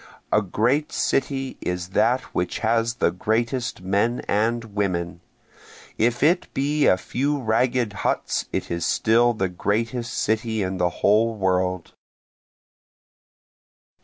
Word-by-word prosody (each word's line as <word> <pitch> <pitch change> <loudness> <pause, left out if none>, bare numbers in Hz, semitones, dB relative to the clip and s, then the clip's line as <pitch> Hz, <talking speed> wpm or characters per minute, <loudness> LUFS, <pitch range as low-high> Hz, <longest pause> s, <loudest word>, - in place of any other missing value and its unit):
A 105 - +4
great 120 +10 0
city 135 0 -1
is 90 0 -3
that 125 +6 +2
which 90 0 -1
has 115 +1 +1
the - - +1
greatest 115 +2 -1
men 100 +6 +1
and 115 +3 +1
women, 90 -4 -2 0.7
If 120 +3 +1
it 175 +4 +2
be 145 +2 +2
a 90 - +5
few 140 +9 -1
ragged 120 -1 +1
huts - - -1
it - - -3
is 85 -1 -2
still 120 +6 +3
the 95 -4 -1
greatest 115 +6 -2
city 110 0 0
in 95 0 -3
the 90 0 +2 0.2
whole 110 +3 +4
world. 95 -3 -1
110 Hz, 125 wpm, -23 LUFS, 95-120 Hz, 0.7 s, a